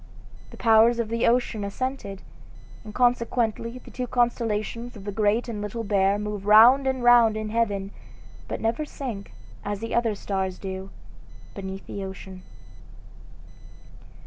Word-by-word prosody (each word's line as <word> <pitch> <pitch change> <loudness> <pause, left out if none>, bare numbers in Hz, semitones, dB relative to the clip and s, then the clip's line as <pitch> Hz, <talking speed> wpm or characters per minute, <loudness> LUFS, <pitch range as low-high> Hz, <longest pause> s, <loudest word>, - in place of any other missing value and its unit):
The - - -13
powers 225 +1 +5
of 230 -2 -2
the 230 +1 +1
ocean 235 -3 +1
assented, 200 -2 -4 0.6
and 215 - -9
consequently 235 -1 0
the 250 - -13
two 250 0 -4
constellations 235 -1 -1
of 205 - -10
the 205 - -4
Great 215 +3 +1
and 220 -3 -5
Little 210 +3 -4
Bear 200 -1 +2
move 210 -1 -5
round 240 +6 +7
and 260 -2 -1
round 240 -3 +6
in 215 0 -4
heaven, 205 -3 -1 0.6
but - - -4
never 230 +6 -1
sink, 245 -9 -6 0.3
as 205 -1 -3
the 230 +1 -5
other 230 -3 +1
stars 190 -2 -3
do, 190 0 -6 0.6
beneath 195 -1 -7
the 200 - -6
ocean. 190 -1 -9
220 Hz, 145 wpm, -25 LUFS, 200-240 Hz, 0.6 s, round